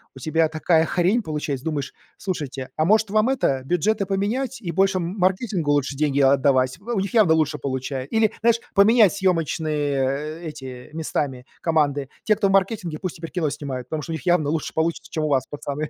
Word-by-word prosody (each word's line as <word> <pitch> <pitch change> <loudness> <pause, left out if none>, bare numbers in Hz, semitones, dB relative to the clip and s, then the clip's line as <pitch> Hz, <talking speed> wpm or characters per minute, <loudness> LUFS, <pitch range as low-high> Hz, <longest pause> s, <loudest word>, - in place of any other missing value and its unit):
у - - -10
тебя 160 +4 +1
такая 160 +1 +2
хрень 190 +7 +2
получается, 150 -4 -4
думаешь: 145 -4 -2 0.3
"Слушайте, 145 -8 -4
а 155 - +1
может 215 +2 +3
вам 215 +3 +2
это, 140 - +1
бюджеты 195 +7 +1
поменять 235 +8 -2
и 170 -4 -3
больше 190 +2 +2
маркетингу 185 -2 0
лучше 145 -1 0
деньги 145 -1 +1
отдавать?" 135 0 +3
В 200 - -21
у 195 - +1
них 195 +5 -3
явно 210 -9 +5
лучше 155 -2 +1
получае 130 0 -4
или, 220 +2 +2
знаешь, 230 0 +3
поменять 210 0 +6
съёмочные 155 -5 -1
эти 130 -5 -8
местами 140 -5 -3 0.2
команды. 145 -4 +1
Те, 215 - +3
кто 200 - +1
в - - +1
маркетинге, 190 -5 0
пусть 185 -3 -4
теперь 165 0 -8
кино 165 -5 0
снимают, 135 -4 -5
потому 155 +1 -3
что 165 - -7
у - - -2
них 160 - -6
явно 175 -5 +2
лучше 160 -1 -2
получится, 160 +1 -1
чем 155 - -2
у - - -1
вас, 135 -3 +2
пацаны. 145 +1 -4
160 Hz, 195 wpm, -23 LUFS, 145-195 Hz, 0.3 s, поменять